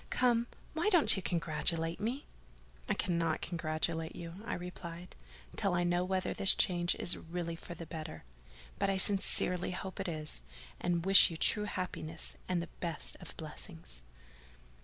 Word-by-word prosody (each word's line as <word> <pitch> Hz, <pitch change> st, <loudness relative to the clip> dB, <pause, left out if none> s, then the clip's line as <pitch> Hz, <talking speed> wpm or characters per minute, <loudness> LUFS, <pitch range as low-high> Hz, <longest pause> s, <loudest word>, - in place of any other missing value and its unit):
Come, 240 Hz, -2 st, +2 dB, 0.3 s
why 330 Hz, +6 st, +1 dB
don't 350 Hz, -7 st, +7 dB
you 195 Hz, -, -2 dB
congratulate 165 Hz, -1 st, -1 dB
me?" 240 Hz, +7 st, -3 dB, 0.6 s
"I -, -, +2 dB
cannot 170 Hz, -3 st, 0 dB
congratulate 160 Hz, -1 st, -2 dB
you," 170 Hz, +1 st, -8 dB
I -, -, -2 dB
replied, 175 Hz, -1 st, -8 dB, 0.4 s
"till 195 Hz, -3 st, +1 dB
I 175 Hz, -, +1 dB
know 175 Hz, 0 st, +1 dB
whether 185 Hz, 0 st, -1 dB
this 195 Hz, -, +5 dB
change 175 Hz, -1 st, +2 dB
is 175 Hz, -, +4 dB
really 170 Hz, 0 st, -5 dB
for 170 Hz, +1 st, -9 dB
the 165 Hz, -, -8 dB
better: 155 Hz, 0 st, -7 dB, 0.6 s
but 200 Hz, -, +1 dB
I 195 Hz, -, +1 dB
sincerely 190 Hz, -2 st, +4 dB
hope 185 Hz, +1 st, -6 dB
it 195 Hz, -, -2 dB
is; 155 Hz, -, -4 dB, 0.4 s
and 175 Hz, 0 st, 0 dB
I 170 Hz, 0 st, -2 dB
wish 195 Hz, 0 st, +7 dB
you 165 Hz, -, -6 dB
true 210 Hz, +6 st, +1 dB
happiness 170 Hz, -5 st, -2 dB
and 175 Hz, -2 st, 0 dB
the 170 Hz, -, -9 dB
best 170 Hz, -3 st, +1 dB
of -, -, -11 dB
blessings." -, -, -8 dB
175 Hz, 160 wpm, -33 LUFS, 165-190 Hz, 0.6 s, don't